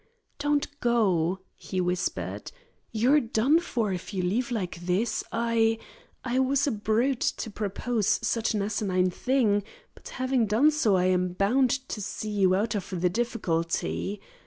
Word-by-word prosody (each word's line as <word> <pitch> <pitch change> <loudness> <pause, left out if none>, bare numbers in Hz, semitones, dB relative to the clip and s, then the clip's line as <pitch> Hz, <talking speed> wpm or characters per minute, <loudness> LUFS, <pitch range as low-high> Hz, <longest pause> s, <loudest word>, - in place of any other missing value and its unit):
"Don't 290 0 +1
go," 190 -7 +1
he 185 - -5
whispered. 180 0 -2 0.4
"You're 245 +7 +4
done 245 +5 +2
for 230 - -1
if 185 +3 -6
you 185 - -1
leave 220 +8 0
like 190 -7 -3
this. 185 +6 0
I 230 -1 +2 0.5
I 250 +1 0
was 270 +1 +2
a 285 - +1
brute 225 +4 0 0.2
to 220 - -5
propose 210 +1 -1
such 225 0 0
an 205 - 0
asinine 190 -3 0
thing, 225 -2 +1 0.3
but - - -12
having 255 -3 +1
done 240 +10 +4
so 265 -10 +2
I 180 0 +2
am 180 -1 +1
bound 245 +8 +2 0.2
to 210 - -5
see 215 +2 -4
you 190 -3 +3
out 210 +3 0
of 205 -3 -4
the 180 -1 +2
difficulty. 195 -3 -2
215 Hz, 155 wpm, -27 LUFS, 190-240 Hz, 0.5 s, You're